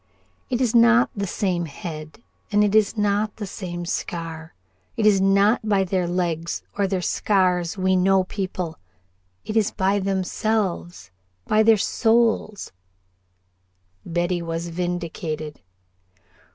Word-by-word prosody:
"It 250 Hz, -1 st, -1 dB
is 245 Hz, -4 st, +1 dB
not 235 Hz, +1 st, +5 dB
the 200 Hz, -1 st, -2 dB
same 180 Hz, -2 st, -1 dB
head 155 Hz, +5 st, -8 dB, 0.3 s
and 205 Hz, 0 st, +4 dB
it 205 Hz, -1 st, +1 dB
is 215 Hz, 0 st, +3 dB
not 210 Hz, 0 st, 0 dB
the 215 Hz, -, -5 dB
same 175 Hz, -3 st, -6 dB
scar. 165 Hz, -, -5 dB, 0.4 s
It 220 Hz, -, +1 dB
is 200 Hz, -2 st, +5 dB
not 200 Hz, +3 st, +3 dB
by 200 Hz, -2 st, +3 dB
their 185 Hz, -1 st, -1 dB
legs 170 Hz, -2 st, -2 dB
or 200 Hz, -1 st, +1 dB
their 185 Hz, -2 st, -2 dB
scars 180 Hz, -3 st, +1 dB
we 190 Hz, 0 st, +2 dB
know 190 Hz, +1 st, +3 dB
people, 185 Hz, -4 st, -4 dB, 0.7 s
it 215 Hz, -, -4 dB
is 220 Hz, -2 st, +3 dB
by 195 Hz, +1 st, +1 dB
themselves 190 Hz, -, -2 dB, 0.3 s
by 215 Hz, -, +3 dB
their 220 Hz, 0 st, +5 dB
souls." 225 Hz, -1 st, +1 dB, 1.3 s
Betty 175 Hz, +1 st, -1 dB
was 165 Hz, 0 st, -4 dB
vindicated. 170 Hz, -3 st, -4 dB
190 Hz, 125 wpm, -23 LUFS, 175-210 Hz, 1.3 s, not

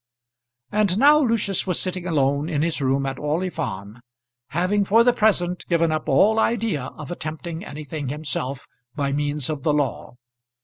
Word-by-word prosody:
And 205 Hz, -3 st, +2 dB
now 290 Hz, +5 st, +6 dB
Lucius 225 Hz, -, +1 dB
was 180 Hz, -, 0 dB
sitting 185 Hz, -1 st, -2 dB
alone 140 Hz, -1 st, +1 dB
in 150 Hz, -3 st, 0 dB
his 165 Hz, -2 st, -1 dB
room 135 Hz, +1 st, +1 dB
at 135 Hz, -1 st, -4 dB
Orley 160 Hz, +5 st, -1 dB
Farm, 100 Hz, -, -5 dB, 0.5 s
having, 185 Hz, +8 st, +1 dB
for 220 Hz, +4 st, +4 dB
the 245 Hz, 0 st, +4 dB
present, 180 Hz, -6 st, +1 dB
given 170 Hz, -2 st, +2 dB
up 155 Hz, 0 st, -2 dB
all 210 Hz, +11 st, +4 dB
idea 220 Hz, -, 0 dB
of 150 Hz, +3 st, -8 dB
attempting 160 Hz, +1 st, -6 dB
anything 150 Hz, -3 st, -6 dB
himself 140 Hz, -2 st, -4 dB, 0.3 s
by 140 Hz, -1 st, -1 dB
means 145 Hz, -1 st, -1 dB
of 150 Hz, -3 st, -3 dB
the 150 Hz, +2 st, +1 dB
law. 140 Hz, -4 st, -2 dB
160 Hz, 165 wpm, -23 LUFS, 145-190 Hz, 0.5 s, now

